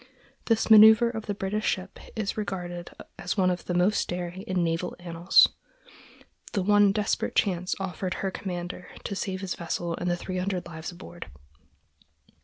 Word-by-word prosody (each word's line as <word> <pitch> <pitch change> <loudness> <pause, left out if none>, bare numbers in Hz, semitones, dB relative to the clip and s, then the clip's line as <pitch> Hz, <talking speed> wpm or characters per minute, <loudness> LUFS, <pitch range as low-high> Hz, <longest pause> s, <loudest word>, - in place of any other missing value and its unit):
This 225 -1 +2
manœuver 220 +2 +8
of 220 -1 -6
the 205 - -2
British 205 +2 -2
ship 185 0 -2 0.2
is 215 -3 -2
regarded 175 -4 -4 0.3
as 180 - -3
one 185 -2 +3
of 180 - -4
the 180 - -2
most 185 +4 +2
daring 175 +1 -4
in 185 -2 -1
naval 165 +1 -1
annals—the 175 - 0
one 205 0 +5
desperate 210 0 -1
chance 180 -3 +1
offered 185 -1 -3
her 195 - -2
commander 180 -1 -6
to 200 - -4
save 190 -1 -3
his 190 -3 -3
vessel 170 0 -3
and 175 - -2
the 175 - 0
three 185 +1 -4
hundred 185 -1 -2
lives 165 -1 -7
aboard. 175 - -10
185 Hz, 160 wpm, -27 LUFS, 175-205 Hz, 0.3 s, manœuver